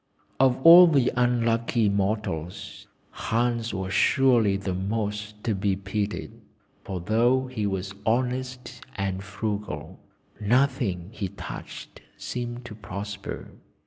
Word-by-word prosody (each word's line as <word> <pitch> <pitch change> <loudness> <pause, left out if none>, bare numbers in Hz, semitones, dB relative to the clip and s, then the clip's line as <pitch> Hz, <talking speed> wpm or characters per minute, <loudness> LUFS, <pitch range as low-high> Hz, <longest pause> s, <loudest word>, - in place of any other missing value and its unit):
"Of 130 -1 +4
all 175 +2 +10
the 140 -6 +3
unlucky 115 -2 +2
mortals, 100 -3 -2 0.2
Hans 115 +1 -1
was 95 -1 -4
surely 120 -7 +4
the 100 -1 -3
most 105 +2 -3
to 115 - 0
be 95 0 0
pitied, 100 +2 -3 0.5
for 95 -2 -4
though 120 +8 +2
he 120 -5 -3
was 95 -1 -3
honest 125 +1 -2
and 95 0 -2
frugal, 105 +1 -5 0.4
nothing 105 -6 +1
he 105 -3 -4
touched 100 - -9 0.2
seemed 120 0 -5
to 115 - -8
prosper. 100 0 -7
105 Hz, 115 wpm, -26 LUFS, 100-120 Hz, 0.5 s, all